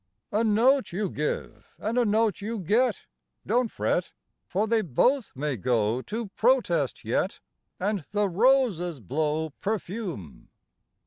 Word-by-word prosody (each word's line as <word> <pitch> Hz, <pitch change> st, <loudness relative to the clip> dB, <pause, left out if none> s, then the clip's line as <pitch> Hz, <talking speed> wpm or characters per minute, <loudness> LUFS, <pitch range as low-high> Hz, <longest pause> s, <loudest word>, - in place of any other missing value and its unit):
IV. 210 Hz, -, +1 dB
A -, -, +2 dB
note 240 Hz, +5 st, +3 dB
you 195 Hz, +1 st, -2 dB
give 150 Hz, 0 st, -3 dB
and 220 Hz, +3 st, -3 dB
a 245 Hz, -1 st, +3 dB
note 215 Hz, -1 st, +2 dB
you 225 Hz, +3 st, -3 dB
get; 215 Hz, +4 st, +1 dB, 0.4 s
don't 235 Hz, +2 st, +2 dB
fret, 175 Hz, -, -1 dB, 0.3 s
For 200 Hz, +4 st, 0 dB
they 225 Hz, 0 st, +2 dB
both 225 Hz, -, +1 dB
may 140 Hz, -1 st, -2 dB
go 115 Hz, +2 st, +1 dB
to 220 Hz, -, -5 dB
protest 195 Hz, -, +1 dB
yet, -, -, -1 dB, 0.4 s
And 200 Hz, -2 st, -1 dB
the 210 Hz, -1 st, +2 dB
roses 195 Hz, -, +2 dB
blow 155 Hz, -, -1 dB
perfume. 195 Hz, -, -4 dB
205 Hz, 135 wpm, -27 LUFS, 160-230 Hz, 0.4 s, note